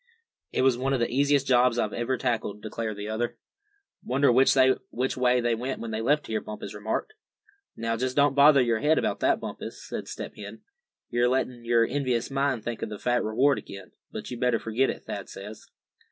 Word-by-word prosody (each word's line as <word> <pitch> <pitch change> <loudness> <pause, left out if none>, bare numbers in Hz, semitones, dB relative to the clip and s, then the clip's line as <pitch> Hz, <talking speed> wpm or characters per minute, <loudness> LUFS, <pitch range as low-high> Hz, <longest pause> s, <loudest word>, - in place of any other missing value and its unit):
"It - - +1
was 130 -2 +3
one 135 +1 0
of 135 - +1
the 120 - 0
easiest 140 +1 +2
jobs 125 -2 +3
I - - +2
ever 125 +2 -1
tackled," 110 -5 -2
declared 110 -1 -4
the 105 0 -5
other. 110 +2 -2 0.7
"Wonder 135 +2 +3
which 130 0 +3
way 125 0 +3
they 120 0 +1
went 125 +4 -3
when 115 - -5
they 110 0 -2
left 145 +6 +2
here?" 110 -1 -2
Bumpus 105 -1 -7
remarked. 110 - -3 0.6
"Now, 115 0 -1
just 130 +2 -2
don't 145 -1 +4
bother 140 -1 +6
your 115 -2 +1
head 155 +6 +3
about - - 0
that, - - +2
Bumpus," - - -7
said - - -5
Step - - -7
Hen. - - -9 0.5
"You're 120 0 +2
letting 125 -2 -1
your 115 -1 +4
envious 125 -2 -1
mind 135 -4 0
think 120 -1 -4
of - - -3
that 105 -2 -7
fat 120 -1 +1
reward 135 +6 +2
again; 95 -2 -11 0.2
but - - -7
you'd 120 - -5
better 125 -2 +2
forget 115 +4 0
it, - - -5
Thad - - -6
says." 105 +3 -10
125 Hz, 200 wpm, -27 LUFS, 115-130 Hz, 0.7 s, bother